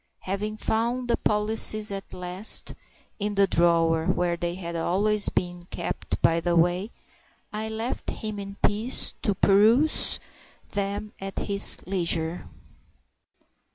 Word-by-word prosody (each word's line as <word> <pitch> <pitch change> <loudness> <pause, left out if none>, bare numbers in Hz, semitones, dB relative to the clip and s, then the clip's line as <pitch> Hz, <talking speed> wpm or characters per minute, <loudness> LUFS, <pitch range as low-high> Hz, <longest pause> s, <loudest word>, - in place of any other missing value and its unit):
Having 210 +3 -4
found 235 +3 -1
the 235 - +2
policies 215 0 +3
at 195 0 -7
last 180 +4 -1 0.5
(in 205 0 -2
the 200 0 +4
drawer 165 -2 +2
where 175 -1 0
they 170 0 -4
had 170 -2 -6
always 200 +5 +1
been 175 -1 -4
kept, 175 - -4
by 165 0 +3
the 175 +1 -1
way), 175 +5 +1 0.6
I 215 +1 -3
left 225 +3 -4
him 215 -2 -5
in 200 0 -8
peace, 215 +5 +3
to 205 -6 -1
peruse 225 +12 +3 0.5
them 205 +1 -3
at 195 0 -7
his 200 -1 +4
leisure. 170 -2 -1
200 Hz, 125 wpm, -25 LUFS, 175-215 Hz, 0.6 s, the